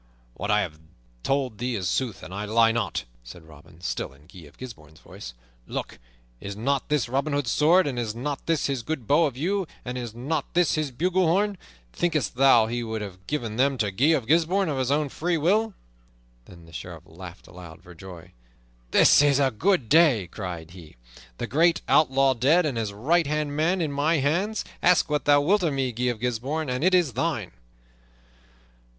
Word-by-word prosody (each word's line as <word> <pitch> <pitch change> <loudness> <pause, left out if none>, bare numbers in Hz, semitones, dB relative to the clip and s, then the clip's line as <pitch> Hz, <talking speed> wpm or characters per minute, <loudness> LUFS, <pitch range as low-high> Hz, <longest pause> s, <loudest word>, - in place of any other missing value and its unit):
"What 100 +9 -5
I 105 0 +3
have 75 -5 -5 0.4
told 130 - -1
thee 125 0 -2
is 95 -4 -2
sooth, 120 +2 -2
and 95 - -9
I 100 +2 -4
lie 115 +1 +3
not," 115 -2 -2 0.2
said 80 +8 -12
Robin, 80 +2 -17
still 85 - -4
in 70 +2 -21
Guy 85 -2 -14
of 70 - -20
Gisbourne's 80 - -11
voice. - - -11 0.3
"Look, - - -6 0.4
is 100 +7 -7
not 135 +6 -1
this 150 -5 +1
Robin 140 +4 -1
Hood's 140 -5 -1
sword, 170 +5 +4
and 130 -4 -3
is 110 -2 -3
not 140 +4 -5
this 165 -2 +1
his 135 -3 -1
good 135 -1 -5
bow 150 +8 +4
of 130 -3 -7
yew, 190 +5 -1 0.2
and 125 0 -4
is 120 -3 -7
not 140 +6 -3
this 175 -3 +3
his 155 -2 -1
bugle 180 +7 0
horn? 200 +5 +1 0.4
Thinkest 160 -5 -1
thou 125 -3 +5
he 120 +2 -3
would 110 -2 -4
have 95 -2 -11
given 115 -7 -3
them 135 +1 +2
to 105 -4 -1
Guy 115 +9 +1
of 155 -7 +2
Gisbourne 170 - +2
of 140 -3 -2
his 130 -1 -1
own 145 +1 +1
free 170 +5 -2
will?" 205 +7 +1 0.7
Then 85 -2 -15
the 80 - -17
Sheriff 85 0 -8
laughed 90 +1 -12
aloud 90 -1 -13
for 90 -1 -13
joy. 90 -1 -12 0.6
"This - - +6
is 145 -2 +4
a 135 -2 +2
good 165 - +1
day!" 145 - +4
cried 85 -5 -7
he. 85 -4 -14 0.4
"The - - -3
great 165 +4 +2
outlaw 135 -2 +3
dead 145 +9 +3
and 140 -5 -2
his 110 -3 -2
right 150 +11 +1
hand 150 -1 -2
man 170 +5 +1
in 155 -3 -1
my 145 +4 +1
hands! 175 +10 -1 0.2
Ask 175 -3 +3
what 150 - 0
thou 145 0 +5
wilt 195 +8 +2
of 165 -5 0
me, 130 -2 -1
Guy 120 +2 -3
of 120 -3 -1
Gisbourne, 125 +5 -2
and 125 +3 -2
it 185 +1 +4
is 170 -8 +2
thine!" 130 - -2
130 Hz, 200 wpm, -25 LUFS, 105-155 Hz, 0.7 s, This